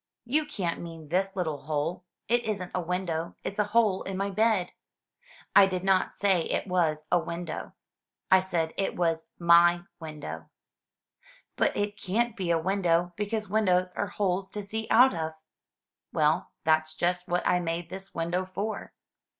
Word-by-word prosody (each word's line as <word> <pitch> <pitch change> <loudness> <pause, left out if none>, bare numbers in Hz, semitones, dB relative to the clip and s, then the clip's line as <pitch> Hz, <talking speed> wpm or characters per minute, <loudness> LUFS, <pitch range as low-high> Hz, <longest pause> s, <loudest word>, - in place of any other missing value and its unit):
*' - - -62
"You 310 -1 +3
can*t 190 - -3
mean 165 -3 -9
this 190 +3 0
little 160 -6 -2
hole! 155 +4 -2 0.2
It 240 +1 +2
isn't 200 -5 -3
a 180 - 0
window; 170 -1 -2
it's 200 - -4
a 210 - +3
hole 210 -2 +2
in 190 -1 -4
my 200 +1 -1
bed." 215 -3 +2 0.4
" - - -26
I 195 - +9
did 185 -1 -3
not 190 -1 +3
say 195 -4 +2
it - - -1
was 165 -5 0
a 175 - +5
window. 170 -1 -5 0.6
I 190 - +8
said 175 -4 -1
it 195 - -1
was 165 -2 0
my 170 0 +6 0.2
window." 150 - -7 1.1
"But - - +1
it 205 0 -2
can't 230 +4 0
be 185 -3 -3
a 170 - +4
window, 175 -1 +1
because 210 +1 -2
windows 185 -3 +2
are 200 - -2
holes 195 -1 -1
to 210 - -4
see 220 +2 -4
out 250 +1 +6
of." 160 -2 -3 0.8
"Well, 155 +3 +2
that's 155 0 +2
just 180 +2 0
what 175 0 0
I 180 - +3
made 165 0 -3
this 190 +1 -7
window 170 +2 -1
for." 195 +4 -5
180 Hz, 170 wpm, -28 LUFS, 170-200 Hz, 1.1 s, I